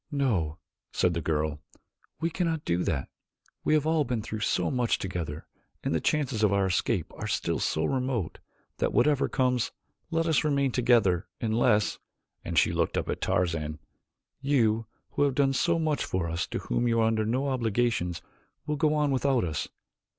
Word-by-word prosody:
"No," 105 - 0 0.3
said 90 - +2
the 85 - -2
girl, 75 -2 -1 0.6
"we 165 +1 -1
cannot 165 -4 -1
do 85 +1 +1
that. - - -1 0.6
We 155 - +3
have 150 -1 +2
all 160 -1 +3
been 120 -4 -2
through 110 - -5
so 105 - +1
much 125 -3 +1
together 85 -5 -4 0.4
and - - 0
the 80 - +1
chances 140 -7 0
of 105 -2 +4
our 100 -1 +2
escape 90 -2 0
are - - -4
still - - -1
so 80 - 0
remote 130 - -1 0.4
that - - 0
whatever 140 +4 +3
comes, 125 -3 +1 0.4
let 165 0 +1
us 160 -3 +2
remain 140 -3 +2
together, 115 -8 +3
unless," 110 -2 +2 0.4
and - - -4
she - - +4
looked - - 0
up - - -2
at - - -2
Tarzan, 80 -4 0 0.6
"you, 115 -6 +2 0.2
who - - -2
have 140 -2 +3
done 135 -1 +3
so 170 +6 +2
much 155 -5 0
for 90 -2 -1
us 85 +1 -2
to - - -3
whom 120 - -1
you 115 -1 +2
are 110 - +4
under 110 -1 +2
no 130 +6 0
obligations, 115 -7 0 0.4
will 150 0 -1
go 155 +1 +2
on 150 -1 +2
without 135 -1 +2
us. 80 -3 -2
120 Hz, 180 wpm, -28 LUFS, 90-140 Hz, 0.6 s, of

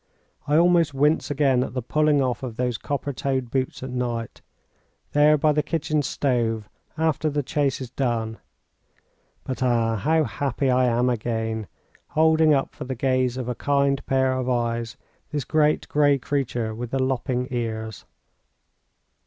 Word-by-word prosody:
I 150 +1 +3
almost 170 -3 +4
wince 150 +3 +2
again 135 -3 +2
at 130 - -7
the 125 - -1
pulling 150 +2 +2
off 125 -2 -1
of 125 -4 -5
those 125 -1 -1
copper 145 0 -3
toed 130 -2 -2
boots 130 -1 -2
at 130 - -5
night, 120 -2 -3 0.7
there 150 +1 +5
by 150 +1 +3
the 150 0 +2
kitchen 155 0 -1
stove, 115 -6 -1 0.3
after 160 -1 +1
the 145 0 -1
chase 140 0 0
is 130 -3 -7
done. 115 -4 -2 1.0
But, 130 0 -5
ah! 115 -3 +2
how 160 +10 +2
happy 140 -2 -1
I 125 0 +3
am 120 +1 +2
again, 110 -2 -2 0.4
holding 160 0 +4
up 135 -2 +1
for - - -7
the 130 0 -4
gaze 130 0 +1
of 125 -2 -4
a 125 - -1
kind 140 +1 +1
pair 130 -1 +2
of 130 -1 -2
eyes 115 -2 -1 0.3
this 145 -4 -3
great, 155 +1 +2
gray 145 -1 +3
creature 125 -5 -2
with 120 +2 -5
the 135 - -1
lopping 130 -1 -1
ears. 110 -3 -4
130 Hz, 160 wpm, -24 LUFS, 120-145 Hz, 1.0 s, there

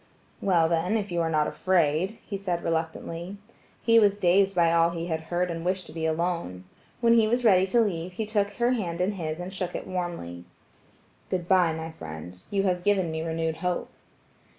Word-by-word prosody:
"Well, 170 -4 +3
then, 170 +6 +1
if 205 -3 -4
you 170 -1 0
are 165 - 0
not 155 -1 +2
afraid," 180 +3 +1
he 205 - -5
said 180 -3 -2
reluctantly. 165 +3 -3 0.5
He 230 -1 +6
was 205 -2 +4
dazed 195 0 +3
by 170 -1 +4
all 165 0 +4
he 170 -1 -4
had 160 -2 -2
heard 180 0 0
and 165 0 -5
wished 185 +1 -1
to - - -11
be 160 0 -1
alone. 165 - -2 0.4
When 230 -1 +5
he 225 -2 +5
was 240 +2 0
ready 190 -3 +5
to 235 +5 +3
leave, 180 -4 -2
he 220 +4 -3
took 205 -1 0
her 240 +1 +1
hand 180 -9 -2
in 185 +3 +1
his 160 -5 -4
and 180 +2 -6
shook 185 -2 -4
it - - -4
warmly. 170 - -5 0.8
"Good 180 -2 -2
bye, 180 -4 +4
my 160 0 -5
friend; 80 - -8
you 200 -1 0
have 180 -2 0
given 190 -4 +2
me 160 0 -3
renewed 160 0 -2
hope." 180 +1 -2
175 Hz, 200 wpm, -27 LUFS, 165-195 Hz, 0.8 s, He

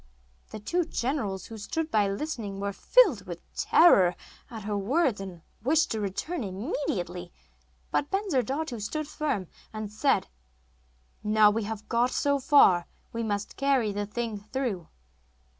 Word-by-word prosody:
The - - -7
two 345 - 0
generals, 235 - -2
who 225 -1 -9
stood 315 +10 -3
by 210 -2 +3
listening, 205 -3 -4
were 200 0 -2
filled 320 - +4
with 170 -1 -7
terror 185 - +5 0.3
at 225 -3 -8
her 205 0 -2
words, 235 - +1
and 180 -4 -8 0.2
wished 310 +6 +3
to 220 - -1
return 210 - -3
immediately; 185 - -3 0.6
but 290 - 0
Bensurdatu 290 - -1
stood 305 +9 -3
firm, 290 -12 -2 0.3
and 215 -1 -5
said: 270 +6 +2 1.0
'Now 210 0 +5
we 220 0 -1
have 215 0 -6
got 240 +2 +2
so 280 +2 +1
far 195 - +5 0.3
we 230 - -2
must 205 -2 -3
carry 270 -6 +2
the 205 0 -3
thing 225 -1 -3
through. 215 -5 -3
220 Hz, 140 wpm, -28 LUFS, 200-280 Hz, 1.0 s, terror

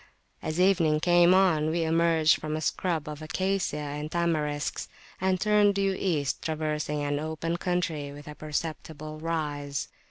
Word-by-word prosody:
As 155 +2 -3
evening 170 -5 +4
came 175 +1 +5
on, 175 -5 +4
we 165 +1 0
emerged 165 -1 +3
from 155 0 -3
a 155 - -3
scrub 165 -3 -1
of 150 0 -6
Acacia 185 +1 -1
and 150 0 -4
Tamarisk 155 -4 -1 0.3
and 185 -1 +2
turned 210 0 +4
due 195 -1 +1
East, 155 -9 -1
traversing 150 -2 -2
an 145 0 -1
open 160 +2 -2
country 170 -5 -2
with 145 +1 -11
a 150 - -6
perceptible 155 0 -5
rise. 145 -4 -3
160 Hz, 150 wpm, -28 LUFS, 150-175 Hz, 0.3 s, came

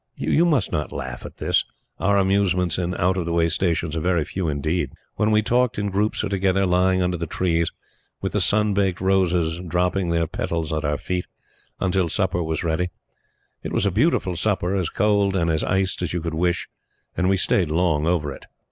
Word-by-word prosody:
You 170 - +2
must 145 - +1
not 75 - -2
laugh 65 -1 -6
at - - -15
this. - - +2 0.4
Our 100 +1 +2
amusements 95 -3 +2
in 90 0 -2
out 90 +2 +1
of 90 - -1
the 85 - -2
way 85 0 +2
Stations 85 -3 -1
are - - 0
very 85 -2 +1
few 95 -3 -3
indeed. 75 +1 -1 0.3
Then 105 - +3
we 110 0 +3
talked 120 +2 +1
in 105 -1 -1
groups 105 +3 0
or - - -2
together, 95 0 +1
lying 95 +1 +2
under 90 0 0
the 85 0 -4
trees, 85 -1 0 0.5
with - - -3
the - - 0
sun 105 0 +2
baked 95 -2 +1
roses 90 -3 +1
dropping 90 +2 0
their 85 0 +1
petals 80 -1 -3
on 80 0 -1
our 75 -1 0
feet, 90 -1 -3 0.5
until 95 -2 +1
supper 90 +1 0
was 80 -1 -2
ready. 85 +2 0 0.7
It - - -5
was - - +1
a 100 - +2
beautiful 105 - +1
supper, 95 0 0
as 90 -4 0
cold 100 -2 +2
and 85 -3 +1
as 80 - 0
iced 95 -1 0
as 90 - -2
you 85 - 0
could 85 0 -3
wish; 85 +2 0 0.5
and 90 +1 +1
we 95 - +3
stayed 90 -2 +2
long 80 -2 +1
over 75 -5 0
it. - - -13
90 Hz, 205 wpm, -23 LUFS, 85-95 Hz, 0.7 s, Then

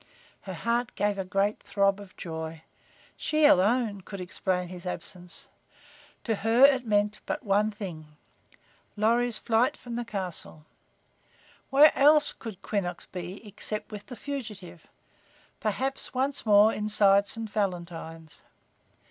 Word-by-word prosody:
Her 190 -2 -7
heart 235 +5 -1
gave 205 -1 0
a - - 0
great 195 +3 0
throb 200 0 +1
of 200 -2 -13
joy. 160 -1 -6 0.5
She 310 0 +1
alone 210 -2 +3
could 195 +1 -8
explain 180 0 -2
his 180 -1 -9
absence. 180 0 -7 0.8
To 225 -3 -1
her 225 +5 +3
it 265 -4 +3
meant 210 0 +1
but - - -3
one 205 +1 +3
thing: 160 -8 -8 0.8
Lorry's 235 +2 +2
flight 230 +2 +1
from 240 -1 -7
the 240 - -2
castle. 185 -7 -5 1.0
Where 290 +3 +7
else 295 +2 +5
could 220 -6 -9
Quinnox 180 -4 -3
be 180 +4 -7
except 210 +1 -6
with 210 -1 -8
the 250 - -8
fugitive, 215 - -7 0.7
perhaps 260 +6 -2
once 265 -1 -1
more 210 +1 +6
inside 205 -1 +3
St. 225 +1 -2
Valentine's? 170 -6 -4
205 Hz, 130 wpm, -28 LUFS, 185-230 Hz, 1.0 s, Where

